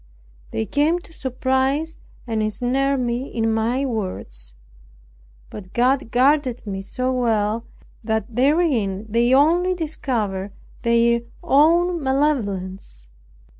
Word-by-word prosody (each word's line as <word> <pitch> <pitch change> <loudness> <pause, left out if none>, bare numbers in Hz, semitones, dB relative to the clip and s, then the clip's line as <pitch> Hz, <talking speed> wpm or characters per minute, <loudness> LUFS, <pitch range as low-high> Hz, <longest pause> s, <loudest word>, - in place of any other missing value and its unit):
They 110 - -2
came 305 +4 +2
to 340 -2 -13
surprise 265 +4 -1 0.3
and 225 -3 -1
ensnare 255 +6 0
me 245 +1 -2
in 225 -1 0
my 235 +5 0
words; 65 - -4 1.0
but 185 -3 -10
God 255 +1 +2
guarded 255 0 +2
me 195 -2 -4
so 255 +6 -2
well, 225 -2 0 0.4
that 220 0 -2
therein 250 - +1
they 235 +3 +2
only 340 +7 +4
discovered 220 - -2 0.3
their 235 0 +3 0.2
own 340 +3 +3
malevolence. 200 - -2
245 Hz, 105 wpm, -22 LUFS, 215-280 Hz, 1.0 s, only